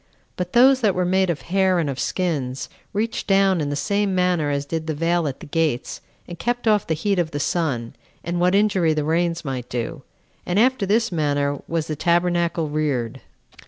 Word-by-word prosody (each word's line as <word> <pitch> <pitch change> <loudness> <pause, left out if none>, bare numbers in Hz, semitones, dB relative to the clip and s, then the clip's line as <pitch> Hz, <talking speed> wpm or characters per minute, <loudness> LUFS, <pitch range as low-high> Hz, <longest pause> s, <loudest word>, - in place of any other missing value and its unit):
But 180 0 -4
those 260 +2 +6
that 210 -5 +2
were 180 0 +1
made 190 +1 +2
of 165 -3 -2
hair 190 0 +2
and 165 -3 0
of 135 -2 -4
skins, 140 -8 -2 0.2
reached 220 +3 -2
down 195 -3 +3
in 145 - -2
the 145 - -2
same 200 +5 0
manner 180 -5 +1
as 140 0 -1
did 160 +2 -4
the 155 - -2
veil 165 +1 +1
at 135 - -5
the - - -8
gates, 155 -5 -1 0.3
and 175 -1 -9
kept 240 0 -2
off 210 -3 +3
the 160 - 0
heat 195 +4 0
of 170 -2 0
the 145 - -4
sun, 140 -8 -1 0.3
and 175 +1 -2
what 180 +2 +3
injury 195 -6 +2
the 150 - 0
rains 165 +2 0
might 130 -3 -4
do. 125 +5 -4 0.4
And 180 - -2
after 245 -2 +3
this 225 +2 +2
manner 145 -3 0
was 165 -2 -1
the 155 - -3
tabernacle 170 0 +1
reared. 145 -6 -2
170 Hz, 200 wpm, -22 LUFS, 150-190 Hz, 0.4 s, those